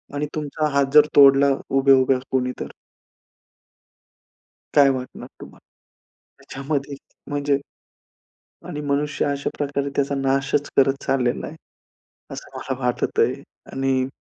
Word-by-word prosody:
आणि 145 Hz, +1 st, -1 dB
तुमचा 150 Hz, 0 st, -2 dB
हात 140 Hz, -1 st, +4 dB
जर 150 Hz, 0 st, +8 dB
तोडला 140 Hz, -1 st, +6 dB, 0.2 s
उभ्या 135 Hz, 0 st, +5 dB
उभ्या 130 Hz, 0 st, +2 dB
कोणी, 125 Hz, -1 st, 0 dB
तर? -, -, -4 dB, 2.1 s
काय 145 Hz, -2 st, +6 dB
वाटणार 130 Hz, -1 st, -5 dB
तुम्हाला? -, -, -14 dB, 0.8 s
त्याच्यामध्ये 140 Hz, 0 st, -4 dB, 0.3 s
म्हणजे 145 Hz, -1 st, 0 dB, 1.1 s
आणि 150 Hz, -, -5 dB
मनुष्य 145 Hz, +1 st, -1 dB
अशा 140 Hz, -1 st, -2 dB
प्रकारे 140 Hz, -1 st, -2 dB
त्याचा 140 Hz, 0 st, 0 dB
नाशच 135 Hz, +1 st, 0 dB
करत 135 Hz, 0 st, +3 dB
चाललेला 125 Hz, -3 st, 0 dB
आहे, 160 Hz, -, -9 dB, 0.8 s
असं -, -, -10 dB
मला 130 Hz, -1 st, -4 dB
वाटतं 125 Hz, -2 st, -1 dB
आहे 130 Hz, +4 st, -2 dB, 0.3 s
आणि 135 Hz, -1 st, 0 dB
140 Hz, 120 wpm, -22 LUFS, 135-145 Hz, 2.1 s, जर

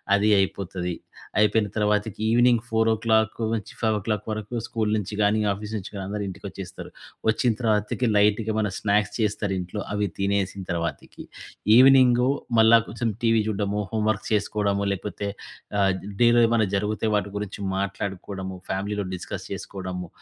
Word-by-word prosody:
అది 105 Hz, +1 st, +2 dB
అయిపోతది. 95 Hz, -2 st, -2 dB, 0.5 s
అయిపోయిన 105 Hz, 0 st, +3 dB
తర్వాతకి 105 Hz, 0 st, 0 dB
ఈవెనింగ్ 120 Hz, 0 st, +4 dB
4-5 110 Hz, -1 st, 0 dB
వరకు 110 Hz, +2 st, -5 dB
స్కూలు 110 Hz, -2 st, -1 dB
నించి 105 Hz, 0 st, -3 dB
గానీ 105 Hz, +1 st, +3 dB
ఆఫీసు 105 Hz, +2 st, -5 dB
నించి 100 Hz, -1 st, -7 dB
గానీ 100 Hz, -1 st, -5 dB
అందరూ 105 Hz, 0 st, -3 dB
ఇంటికొచ్చేస్తారు. 95 Hz, -, -8 dB, 0.4 s
వచ్చిన 115 Hz, +2 st, +2 dB
తర్వాతకి 110 Hz, +1 st, 0 dB
లైట్‌గా 105 Hz, +1 st, +3 dB
ఏమన్నా 105 Hz, -2 st, 0 dB
స్నాక్స్ 105 Hz, 0 st, +1 dB
చేస్తారింట్లో. 100 Hz, -3 st, -1 dB
అవి 105 Hz, 0 st, 0 dB
తినేసిన 100 Hz, 0 st, 0 dB
తర్వాతకి 85 Hz, -1 st, -4 dB, 0.5 s
ఈవెనింగు 130 Hz, -1 st, +6 dB, 0.3 s
మళ్ళా 110 Hz, +1 st, +7 dB
కొంచుం 115 Hz, +1 st, -2 dB
టీవీ 115 Hz, -1 st, +3 dB
చూడ్డము, 105 Hz, -1 st, -1 dB
హోంవర్క్ 110 Hz, -2 st, 0 dB
చేసుకోవడము 100 Hz, -1 st, 0 dB
లేకపోతే 100 Hz, +1 st, -4 dB, 0.5 s
ఆహ్, 95 Hz, -1 st, +4 dB
జ్ -, -, -12 dB, 0.2 s
డేలో 120 Hz, 0 st, +6 dB
ఏమైనా 115 Hz, -2 st, +2 dB
జరుగుతే 105 Hz, +2 st, -1 dB
వాటి 100 Hz, -1 st, 0 dB
గురించి 105 Hz, 0 st, -5 dB, 0.2 s
మాట్లాడుకోవడము. 95 Hz, -1 st, -4 dB
ఫ్యామిలీలో 100 Hz, +2 st, -2 dB
డిస్కస్ -, -, -6 dB
చేసుకోడము. 90 Hz, -2 st, -5 dB
105 Hz, 130 wpm, -25 LUFS, 100-110 Hz, 0.5 s, మళ్ళా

